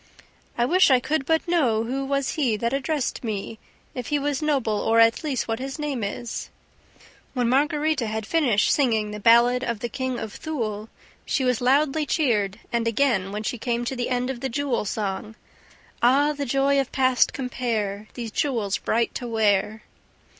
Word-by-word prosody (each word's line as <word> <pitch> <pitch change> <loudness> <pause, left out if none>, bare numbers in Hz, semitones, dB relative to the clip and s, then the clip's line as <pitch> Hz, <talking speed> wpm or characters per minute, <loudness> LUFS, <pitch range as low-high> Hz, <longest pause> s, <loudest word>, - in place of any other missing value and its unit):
"I 240 - +2
wish 365 +6 +4
I 260 -2 +5
could 295 +2 -2
but 320 +1 +1
know 255 -11 +2
who 265 +4 -3
was 275 0 -1
he 250 -8 0
That 235 +3 -1
addressed 280 -1 -2
me, 220 -1 -4 0.3
If 250 -3 -5
he 295 - +1
was 285 0 -1
noble, 265 -9 0
or, 225 +1 +2
at 230 +6 +4
least, 280 -5 -2
what 225 0 -2
his 270 +2 -5
name 290 -6 -3
is 225 +3 -5 0.4
..." - - -27
When 245 -2 +1
Margarita 295 0 +1
had 220 0 -3
finished 245 -7 +2
singing 220 -7 +1
the 210 - -6
ballad 235 +3 +5
of 235 -3 -2
the 240 - -4
KING 260 +1 -3
OF 220 -2 -6
THULE, 225 -9 -4 0.3
she 265 - -1
was 250 -2 +1
loudly 290 +4 +2
cheered 215 - +1
and 235 -1 +1
again 230 -6 +1
when 210 +1 -4
she 240 +2 -3
came 240 0 -1
to 265 - -3
the 245 -1 -2
end 250 +1 0
of 255 - -7
the 265 - -3
jewel 270 -3 -1
song: 210 +1 -3 0.7
"Ah, 280 +5 +4
the 285 -1 -4
joy 275 +2 +2
of 270 - -2
past 255 -2 +3
compare 225 -6 -3
These 235 -3 -5
jewels 225 -7 -1
bright 230 +1 0
to 245 - -5
wear! 215 -1 +1
245 Hz, 185 wpm, -24 LUFS, 220-275 Hz, 0.7 s, I